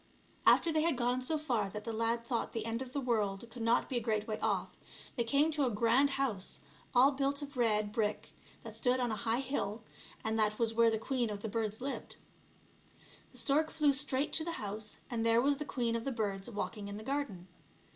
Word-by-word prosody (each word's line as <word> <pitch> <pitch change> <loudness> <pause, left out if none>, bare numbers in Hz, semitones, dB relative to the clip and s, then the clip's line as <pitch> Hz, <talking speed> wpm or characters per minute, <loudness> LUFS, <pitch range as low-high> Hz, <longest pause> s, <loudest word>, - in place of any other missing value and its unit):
After 335 - +6
they 310 -1 +2
had 325 -4 +1
gone 245 +1 +1
so 310 +5 0
far 240 -10 0
that 210 +1 -6
the 230 - -4
lad 230 +1 0
thought 235 -1 -2
the 225 - -3
end 230 +2 -2
of 260 -1 -6
the 280 - -2
world 220 -4 0
could 245 - -8
not 230 +1 +3
be 255 - -2
a - - 0
great 215 -2 0
way 215 -1 -3
off, - - -1 0.4
they 235 - +1
came 280 +7 +3
to 295 -2 +1
a - - +2
grand 235 +5 +3
house, 230 -9 0 0.3
all 260 +3 +7
built 280 +1 -1
of 285 0 -9
red 215 -4 +2
brick, 215 -2 -1 0.3
that - - -8
stood 250 0 +2
on 245 -2 0
a - - 0
high 225 +4 0
hill, 230 -5 -3 0.4
and 220 0 0
that 215 0 +2
was 230 -1 +1
where 230 0 +5
the 220 - +1
queen 240 +1 -1
of 205 -1 -5
the 220 - -2
birds 215 0 -2
lived. 275 +2 -4 1.2
The - - -12
stork 305 +3 +2
flew 295 -2 +3
straight 275 0 0
to 320 - +2
the 335 +1 -3
house, 210 -3 -5
and 230 -2 -2
there 230 0 +5
was 280 +3 +3
the 300 - -3
queen 240 -4 -1
of 230 - -2
the 275 - -2
birds 205 -4 -2
walking 205 -1 -4
in 200 0 -5
the 215 - -8
garden. 235 -9 -3
235 Hz, 225 wpm, -33 LUFS, 215-270 Hz, 1.2 s, all